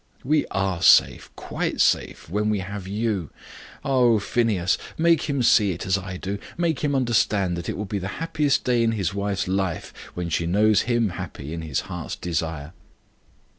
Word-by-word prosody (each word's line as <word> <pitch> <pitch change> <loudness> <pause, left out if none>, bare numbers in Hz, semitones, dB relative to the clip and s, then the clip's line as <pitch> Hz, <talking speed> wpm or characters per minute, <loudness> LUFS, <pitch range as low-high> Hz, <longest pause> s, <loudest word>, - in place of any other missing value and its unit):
"We 150 +3 +1
are 95 -3 -1
safe - - +5
quite - - -3
safe - - +1
when 105 +5 -1
we 105 - +1
have 95 0 -6
you. 105 -4 -2 0.6
Oh, 125 -4 +4
Phineas! 100 -3 +1 0.2
make 165 -2 +3
him 140 -3 0
see 105 -4 +4
it 85 - -7
as 95 - +2
I 95 -2 -4
do. 100 +2 -4 0.2
Make 170 -4 0
him 145 -2 0
understand 110 -7 +1
that 85 -1 -5
it - - -3
will 105 - -3
be 100 +1 -3
the 95 - -4
happiest 150 -3 0
day 125 -2 +2
in 115 -1 +2
his 100 -4 -1
wife's 100 -2 -2
life 95 -2 -2 0.2
when 90 -1 -3
she 85 +1 -1
knows 105 +4 +4
him 120 -3 +2
happy 85 -5 -7
in 85 - -4
his 75 -4 -2
heart's - - -6
desire." 80 -2 -4
100 Hz, 180 wpm, -24 LUFS, 90-115 Hz, 0.6 s, safe